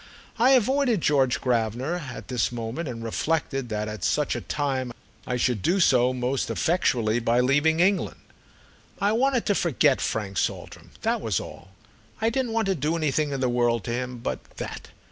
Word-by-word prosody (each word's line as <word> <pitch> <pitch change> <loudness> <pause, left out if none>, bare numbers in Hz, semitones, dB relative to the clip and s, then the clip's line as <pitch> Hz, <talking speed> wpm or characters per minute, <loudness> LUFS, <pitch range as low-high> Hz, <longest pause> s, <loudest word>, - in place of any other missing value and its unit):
I 255 +3 +6
avoided 260 -2 +3
George 135 -5 +2
Gravener 125 +7 0
at - - -9
this 125 -2 0
moment 120 +6 -4
and 115 -2 -6
reflected 135 +1 -1
that 105 -1 -2
at 105 -4 -6
such - - +1
a - - -3
time 135 -4 -2 0.4
I 125 - -1
should 125 -4 0
do 180 - +2
so 125 -7 +4
most 130 +1 -1
effectually 120 -10 +1
by 120 +1 +2
leaving 145 +5 +3
England. 190 +2 +1 0.8
I 200 +1 +2
wanted 255 +2 +2
to 205 - +2
forget 150 -6 +2
Frank 100 -3 -2
Saltram—that - - -3
was - - 0
all. - - -10 0.5
I 225 +1 +1
didn't 245 -2 -1
want 225 -1 +1
to 195 - +2
do 155 0 -1
anything 155 -1 0
in 135 -2 -3
the 130 - +2
world 120 -2 +1
to - - -4
him 125 +1 -3
but 65 - -4
that. - - -6
135 Hz, 175 wpm, -25 LUFS, 120-175 Hz, 0.8 s, I